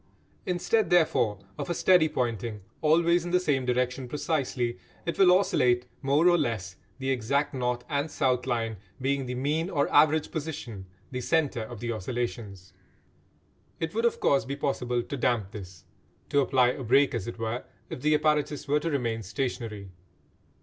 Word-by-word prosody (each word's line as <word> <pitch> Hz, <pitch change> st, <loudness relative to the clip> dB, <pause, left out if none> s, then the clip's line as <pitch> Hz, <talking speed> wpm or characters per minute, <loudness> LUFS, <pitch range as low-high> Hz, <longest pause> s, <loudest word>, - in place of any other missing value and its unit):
Instead, 185 Hz, +5 st, +1 dB
therefore, 155 Hz, -, +3 dB, 0.2 s
of -, -, -4 dB
a 175 Hz, -, 0 dB
steady 175 Hz, -3 st, +4 dB
pointing, 115 Hz, -4 st, -2 dB, 0.2 s
always 170 Hz, +2 st, +3 dB
in 175 Hz, -, -4 dB
the 180 Hz, +1 st, +3 dB
same 135 Hz, -7 st, 0 dB
direction 125 Hz, +1 st, 0 dB
precisely, 130 Hz, -, -2 dB, 0.3 s
it 170 Hz, -, -3 dB
will 185 Hz, -2 st, +7 dB
oscillate 125 Hz, -10 st, +3 dB, 0.2 s
more 145 Hz, +5 st, +3 dB
or 175 Hz, -1 st, +5 dB
less, 95 Hz, -6 st, -2 dB, 0.2 s
the 135 Hz, 0 st, -2 dB
exact 140 Hz, +4 st, 0 dB
north 125 Hz, -2 st, -1 dB
and 145 Hz, 0 st, -1 dB
south 130 Hz, -4 st, 0 dB
line 115 Hz, -3 st, -1 dB, 0.2 s
being 135 Hz, 0 st, -1 dB
the 125 Hz, -, -3 dB
mean 150 Hz, +7 st, -1 dB
or 145 Hz, -6 st, +1 dB
average 155 Hz, +1 st, +4 dB
position, 130 Hz, -, -5 dB, 0.2 s
the 125 Hz, -1 st, -3 dB
centre 145 Hz, -4 st, +1 dB
of 110 Hz, 0 st, -8 dB
the 120 Hz, 0 st, -2 dB
oscillations. 110 Hz, -4 st, -5 dB, 1.1 s
It 165 Hz, 0 st, -3 dB
would 230 Hz, +2 st, 0 dB
of 235 Hz, -, +1 dB
course 140 Hz, -, +3 dB
be 140 Hz, +1 st, -4 dB
possible 125 Hz, -4 st, -1 dB
to 140 Hz, -, -5 dB
damp 120 Hz, -6 st, 0 dB
this, 95 Hz, -6 st, -10 dB, 0.4 s
to 145 Hz, -, +3 dB
apply 130 Hz, -2 st, +3 dB
a 130 Hz, +2 st, -4 dB
break 135 Hz, +4 st, +4 dB
as 115 Hz, -6 st, -3 dB
it 120 Hz, -, -6 dB
were, 115 Hz, +2 st, -3 dB, 0.3 s
if -, -, -6 dB
the 150 Hz, +2 st, +3 dB
apparatus 150 Hz, -1 st, 0 dB
were 145 Hz, +1 st, +3 dB
to 165 Hz, -, -2 dB
remain 120 Hz, -6 st, -1 dB
stationary. 110 Hz, -3 st, -4 dB
130 Hz, 170 wpm, -27 LUFS, 120-150 Hz, 1.1 s, will